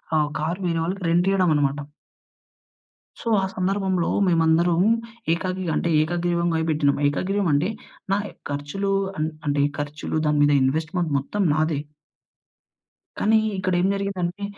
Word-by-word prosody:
ఆహ్, 150 -1 +2
కార్ 165 +4 -2
వేరే 165 -1 0
వాళ్ళకి 185 +3 -3
రెంట్ 175 +2 +2
ఇయ్యడం 185 -3 +3
అనమాట. 145 0 +1 1.4
సో, - - -8
ఆ - - -2
సందర్భంలో 190 -1 0 0.2
మేమందరం 165 0 +3 0.5
ఏకగీ 185 +2 -3
అంటే 170 - 0
ఏకగ్రీవంగా 170 0 0
పెట్టినాం. 145 -2 +2
ఏకగ్రీవం 190 +7 0
అంటే, 150 +7 +2 0.4
నాయి 205 +1 -1 0.2
ఖర్చులు 145 +8 -3 0.3
అన్ 155 +1 0 0.2
అంటే 145 0 +2 0.2
ఖర్చులు 145 +2 -3
దాని 150 -1 +2
మీద 145 0 +4
ఇన్వెస్ట్మెంట్ 160 +4 -1
మొత్తం 195 +9 -2
నాదే. 155 -1 0 1.4
కానీ, 220 +1 +4 0.2
ఇక్కడేం 185 -1 +1
జరిగిందంటే 195 -1 -3
170 Hz, 125 wpm, -23 LUFS, 150-185 Hz, 1.4 s, మీద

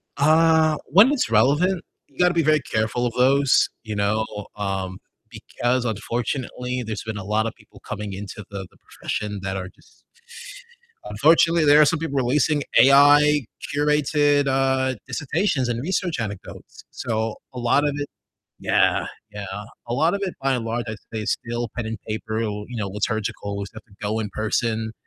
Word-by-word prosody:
Uh, 160 +1 +4
when 200 - +6
it's 290 -4 0
relevant, 150 - +3 0.2
you - - -28
gotta 180 0 +3
be 165 -2 +2
very 155 0 +3
careful 110 0 -1
of 120 - -2
those, 135 +2 +4
you 110 -3 -5
know, 105 +2 +1 0.3
um, 95 -2 -3 0.3
because 125 +1 -2
unfortunately 125 +3 -3
there's 110 -1 -5
been 110 -1 -4
a 100 - -6
lotta 110 +2 0
people - - -19
coming 105 -1 -6
into 100 +2 -7
the 100 -1 -6
the - - -24
profession 105 -1 -5
that 95 0 -3
are 95 -1 -5
just - - -25 1.0
unfortunately, 160 +9 +3
there 145 +1 +7
are - - +7
some 155 0 +1
people 140 -4 -3
releasing 140 +3 +2 0.2
AI 145 +3 +6 0.3
curated, 145 -1 +2
uh, 130 -1 +1
dissertations 140 0 -1
and 120 0 -2
research 175 -1 -1
anecdotes, 100 -4 -7
so, 110 -1 -2 0.2
a 125 - -6
lot 120 +4 +2
of 145 - -1
it 145 0 -3 0.5
Yeah, - - +2 0.2
yeah, 105 -1 -6 0.4
a 120 - -2
lot 160 +6 +2
of 200 - -4
it, 185 - -3
by 135 0 +1
and 120 -3 -2
large, 120 +1 -2
I'd 110 - -4 0.2
say 110 - -2
is - - -1
still 120 0 -4
pen 120 -2 -3
and 110 - -4
paper 110 0 -3
or, 105 -1 -4
you 125 - -6
know, 100 -3 -2
liturgical, 105 0 -3
we 100 - -4
still 110 +2 -11
have 100 - -22
to 105 -1 -5
go 110 +1 -1
in 105 -2 -3
person, 110 0 -1
120 Hz, 175 wpm, -23 LUFS, 110-145 Hz, 1.0 s, there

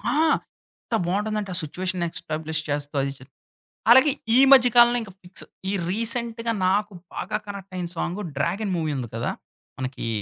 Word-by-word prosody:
ఆ! - - +1 0.7
ఎంత - - -3
బావుంటందంటే 210 +2 -1
ఆ - - 0
సిచ్యుయేషన్ 180 +3 -3
ఎస్టాబ్‌లిష్ 155 0 -3
చేస్తా 145 0 -2
అది 135 0 -2 0.8
అలాగే 265 +4 +7 0.2
ఈ - - +7
మధ్య 260 -2 +8
కాలంలో 240 0 +7
ఇంకా 205 -4 -9
ఫిక్స్ 180 +1 -6 0.3
ఈ - - -1 0.2
రీసెంట్‌గా 230 +2 +1 0.2
నాకు 205 +2 +1 0.2
బాగా 210 +3 -2
కనెక్టయిన 195 -3 -6
సాంగ్ 175 +4 -2 0.2
'డ్రాగన్' 185 +7 -1
మూవీ 160 -2 -1
ఉంది 120 -3 -4
కదా! 115 - -1 0.5
మనకి 130 -2 -4
190 Hz, 145 wpm, -24 LUFS, 160-220 Hz, 0.8 s, మధ్య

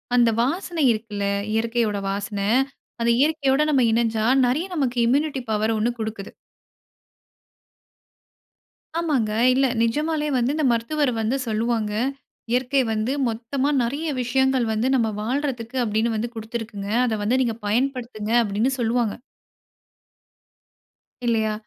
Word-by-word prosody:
அந்த 240 -1 +5
வாசனை 330 +3 -1
இருக்குல்ல, 215 -2 -3 0.3
இயற்கையோட 225 -2 0
வாசன 200 +1 -3 0.6
அந்த 235 0 +3
இயற்கையோட 290 -2 +2
நம்ம 275 -3 +3
இணஞ்சா 225 -1 +1 0.2
நறைய 300 +10 0
நமக்கு 255 -5 -1
இம்யூனிட்டி 275 +1 +1
பவர் 215 +1 +1
ஒண்ணு 225 +3 +1
குடுக்குது. 220 -2 -5 2.7
ஆமாங்க. 270 -10 0 0.2
இல்ல 270 +1 +3 0.2
நிஜமாலே 300 +5 0
வந்து 250 +4 +1
இந்த 310 -3 0
மருத்துவர் 250 +4 0
வந்து 235 +5 0
சொல்லுவாங்க. 220 -1 0 0.6
"இயற்கை 260 +2 +2
வந்து 220 +5 -1 0.2
மொத்தமா 255 +5 -2
நெறைய 285 +7 -2
விஷயங்கள் 265 0 +2
வந்து 230 +5 0
நம்ப 225 -3 +2
வாழ்றதுக்கு 255 0 -2
அப்படின்னு 220 +1 0
வந்து 235 +2 -2
குடுத்திருக்குங்க. 220 -2 -5 0.2
அத 220 -3 0
வந்து 250 +5 +2
நீங்க 230 -2 -1
பயன்படுத்துங்க" 235 -2 -1
அப்படின்னு 215 +5 0
சொல்லுவாங்க. 230 -2 0 2.1
இல்லையா? 220 -2 +1
235 Hz, 115 wpm, -23 LUFS, 220-270 Hz, 2.7 s, அந்த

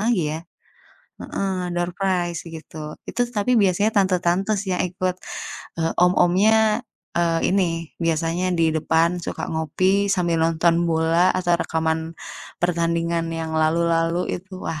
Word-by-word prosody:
lagi 220 -4 +2
ya. 160 - -4 0.8
Heeh, 185 -2 -3
doorprize 175 0 -1
begitu. 155 -2 -8
Itu - - -5
tapi 230 +4 +2
biasanya 200 +1 +3
tante-tante 185 +1 +1
sih 190 - -4
yang - - +1
ikut. 185 0 -2 0.6
Eee, 165 0 +1
om-omnya, 210 +6 +4 0.3
eee, 170 -1 +2
ini 195 +1 +3 0.4
biasanya 165 +2 0
di 160 -1 +2
depan 165 +2 +1
suka - - -4
ngopi 185 +6 +1
sambil 170 -4 +1
nonton 165 +1 +3
bola 165 +2 +3
atau 175 -1 +2
rekaman 160 0 0 0.6
pertandingan 170 -1 0
yang 160 0 -4
lalu-lalu, 165 +1 +2 0.2
itu 190 +2 -15
wah 155 - -3
175 Hz, 125 wpm, -22 LUFS, 165-185 Hz, 0.8 s, om-omnya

